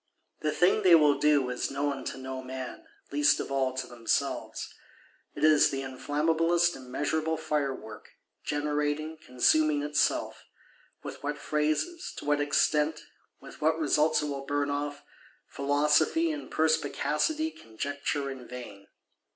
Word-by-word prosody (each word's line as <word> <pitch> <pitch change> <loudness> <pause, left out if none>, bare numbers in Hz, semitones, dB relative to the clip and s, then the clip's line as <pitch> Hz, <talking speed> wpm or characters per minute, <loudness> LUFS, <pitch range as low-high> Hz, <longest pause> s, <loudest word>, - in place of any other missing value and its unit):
The 155 - -1
thing 180 +6 +3
they 185 -4 +7
will 150 -3 +4
do 150 -3 +3
is 125 - -2
known 140 -1 -2
to - - -4
no 130 0 -6
man; 130 0 -7 0.2
least 145 0 +3
of - - -5
all 135 -1 +1
to 130 - -3
themselves. 120 -2 -2 0.6
It - - -5
is 155 -1 +6
the 135 -1 -3
inflammablest 165 +6 +1
immeasurable 150 +5 -2
Fire 145 -4 -1
work, 110 -3 -11 0.3
generating, 150 +1 -2
consuming 145 +4 +2
itself. 150 0 0 0.6
With - - -8
what 145 +1 -3
phases, 155 - -1
to - - -7
what 145 0 +2
extent, 150 +1 +1 0.4
with - - -13
what 160 +1 +2
results 155 0 +2
it - - -1
will 140 -2 -4
burn 145 0 0
off, 145 0 -3 0.4
Philosophy 150 - +2
and 300 -1 -6
Perspicacity 160 - 0
conjecture 140 - -4
in 130 -2 -9
vain. 110 -6 -9
145 Hz, 135 wpm, -29 LUFS, 135-155 Hz, 0.6 s, they